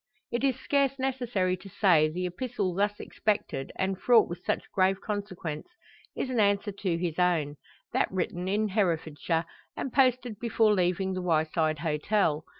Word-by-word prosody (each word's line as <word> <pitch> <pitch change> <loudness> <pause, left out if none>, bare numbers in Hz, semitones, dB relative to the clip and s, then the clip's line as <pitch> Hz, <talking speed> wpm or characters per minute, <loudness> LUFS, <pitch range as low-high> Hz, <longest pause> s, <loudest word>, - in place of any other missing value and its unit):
It 240 +2 -1
is 265 -2 +1
scarce 275 -1 +1
necessary 245 -9 0
to 190 +2 -12
say, 170 -6 +4
the 180 +3 -3
epistle 195 0 -2
thus 205 +3 0
expected, 205 -10 -2
and 190 0 -2
fraught 235 -3 +5
with 175 +1 -7
such - - -1
grave 190 0 +2
consequence, 200 - -5 0.5
is 260 - -2
an 245 - 0
answer 205 0 +2
to 190 -3 -2
his 170 -1 -3
own; 160 -5 +1 0.4
that - - +1
written 180 -1 -2
in 210 +2 +1
Herefordshire, 165 -4 0 0.3
and 265 - -4
posted 250 -4 +2
before 225 -2 +3
leaving 185 0 +1
the 185 - -3
Wyeside 160 -2 +1
Hotel. 160 0 +1
190 Hz, 155 wpm, -28 LUFS, 170-215 Hz, 0.5 s, fraught